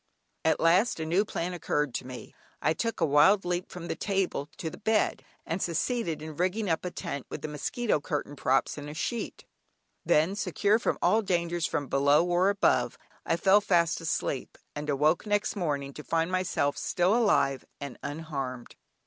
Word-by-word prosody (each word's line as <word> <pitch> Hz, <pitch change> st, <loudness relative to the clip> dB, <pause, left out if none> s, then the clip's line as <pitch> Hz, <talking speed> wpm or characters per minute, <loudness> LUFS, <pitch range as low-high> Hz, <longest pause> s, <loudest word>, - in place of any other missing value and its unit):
At 160 Hz, -, +2 dB
last 180 Hz, +5 st, +3 dB
a 160 Hz, -, -2 dB
new 175 Hz, +6 st, +2 dB
plan 180 Hz, -3 st, -3 dB
occurred 150 Hz, -5 st, -1 dB
to 125 Hz, -, -4 dB
me. 130 Hz, -1 st, -9 dB, 0.3 s
I 155 Hz, -, +2 dB
took 230 Hz, +6 st, -2 dB
a -, -, +3 dB
wild 155 Hz, +8 st, +5 dB
leap 175 Hz, 0 st, -2 dB
from 175 Hz, -1 st, -7 dB
the -, -, -2 dB
table 190 Hz, -7 st, -1 dB
to 160 Hz, -, -4 dB
the -, -, -11 dB
bed, 220 Hz, 0 st, +1 dB, 0.2 s
and 170 Hz, +4 st, -3 dB
succeeded 170 Hz, -1 st, -1 dB
in 155 Hz, -1 st, -7 dB
rigging 185 Hz, +2 st, 0 dB
up 160 Hz, -, 0 dB
a 180 Hz, -, -2 dB
tent 140 Hz, -5 st, -5 dB
with -, -, -7 dB
the -, -, -2 dB
mosquito 155 Hz, +7 st, -1 dB
curtain 145 Hz, -1 st, -3 dB
props, 135 Hz, +2 st, +1 dB
and 145 Hz, 0 st, -7 dB
a 150 Hz, -, -8 dB
sheet. 235 Hz, +8 st, -4 dB, 0.6 s
Then, 160 Hz, +6 st, +3 dB
secure 205 Hz, +1 st, +1 dB
from -, -, 0 dB
all 220 Hz, -, +4 dB
dangers 175 Hz, -3 st, 0 dB
from 145 Hz, -3 st, -2 dB
below 140 Hz, +4 st, +3 dB
or 180 Hz, +2 st, +3 dB
above, 200 Hz, 0 st, +2 dB, 0.3 s
I -, -, +3 dB
fell 195 Hz, +4 st, +5 dB
fast 170 Hz, -5 st, +2 dB
asleep, 150 Hz, -4 st, -2 dB, 0.2 s
and 150 Hz, 0 st, -4 dB
awoke 150 Hz, +7 st, +2 dB
next 205 Hz, +1 st, 0 dB
morning 145 Hz, -7 st, -2 dB
to 150 Hz, -, -9 dB
find 165 Hz, +3 st, 0 dB
myself 185 Hz, -6 st, 0 dB
still 185 Hz, +3 st, +1 dB
alive 140 Hz, -, +2 dB, 0.2 s
and 140 Hz, -4 st, -7 dB
unharmed. 140 Hz, -5 st, -5 dB
165 Hz, 185 wpm, -28 LUFS, 150-190 Hz, 0.6 s, wild